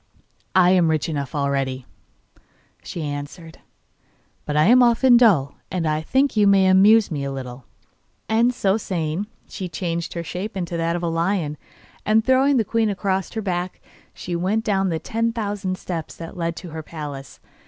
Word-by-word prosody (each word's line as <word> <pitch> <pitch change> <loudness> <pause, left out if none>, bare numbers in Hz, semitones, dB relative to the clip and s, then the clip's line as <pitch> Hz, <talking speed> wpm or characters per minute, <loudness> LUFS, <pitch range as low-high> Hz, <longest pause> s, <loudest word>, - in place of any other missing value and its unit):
'I 180 -1 +6
am 180 -3 +4
rich 155 -2 0
enough 145 -3 -4
already,' 135 -2 -1 1.0
she 170 - -6
answered, 145 +3 -7 0.9
'but 150 0 -2
I 150 - +5
am 245 +8 +6
often 245 +1 +5
dull, 195 - +4 0.2
and 180 -3 -2
I 155 0 0
think 265 - +1
you 210 -2 +4
may 195 -1 +5
amuse 200 +3 +5
me 145 -3 -3
a 140 - -3
little.' 130 -2 -7 0.6
And, 230 +3 +3
so 205 -5 +1
saying, 175 -2 -3 0.2
she 185 -3 -6
changed 170 0 -3
her 170 - -4
shape 190 +5 -5
into 175 -2 -3
that 165 0 0
of 175 - -4
a - - 0
lion, 165 -2 -1 0.5
and 220 +1 +2
throwing 265 +1 +4
the 225 - +1
queen 225 0 +1
across 195 -2 -2
her 220 -1 -3
back, 180 -1 -3 0.3
she 175 - -6
went 195 +6 0
down 195 -2 +1
the 165 - -1
ten 230 +7 -2
thousand 205 -4 -3
steps 170 -4 -6
that 165 -1 -9
led 170 -1 -2
to 175 -2 -9
her 160 0 -5
palace. 145 -4 -8
180 Hz, 175 wpm, -22 LUFS, 160-210 Hz, 1.0 s, I